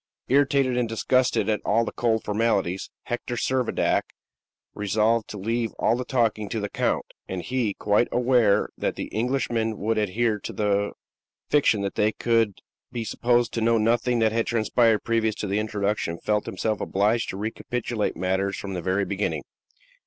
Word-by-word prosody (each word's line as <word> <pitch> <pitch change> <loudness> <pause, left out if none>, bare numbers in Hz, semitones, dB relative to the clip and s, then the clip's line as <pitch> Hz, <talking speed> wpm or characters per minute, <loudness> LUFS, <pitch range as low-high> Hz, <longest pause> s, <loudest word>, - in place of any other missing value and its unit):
Irritated 135 -2 +3
and 120 -2 0
disgusted 125 -1 +1
at 105 -2 0
all 115 +3 +2
the - - -4
cold 115 -2 0
formalities, 105 -4 0
Hector 120 0 -4
Servadac 130 0 +1 0.7
resolved 110 +2 +1
to 105 - -7
leave 115 +3 -1
all - - +2
the 125 - -3
talking 115 -5 0
to 115 - -2
the 105 -1 -3
count; - - 0 0.2
and 95 -1 -4
he, 125 -6 -1
quite 105 +3 +2
aware 120 -4 +3
that - - -2
the - - -6
Englishmen 115 -2 0
would 110 +2 0
adhere 105 +2 0
to - - -6
the 100 -1 0 0.6
fiction 135 -8 +3
that 100 -1 -2
they 105 +1 +2
could 115 -3 +1 0.3
be 120 -2 -3
supposed 120 +2 +1
to 115 - -1
know 115 +1 +3
nothing 120 +2 +2
that 110 -1 +3
had 115 +1 0
transpired 115 -1 +2
previous 115 -2 +1
to - - -4
the 100 +1 0
introduction 105 -5 -1
felt 105 +3 -1
himself 105 +3 -2
obliged 105 +4 +1
to 95 - -4
recapitulate 110 +1 -2
matters 95 +2 0
from 100 -1 -5
the 90 - -3
very 95 +3 0
beginning. 100 +1 -2
110 Hz, 165 wpm, -25 LUFS, 105-120 Hz, 0.7 s, Irritated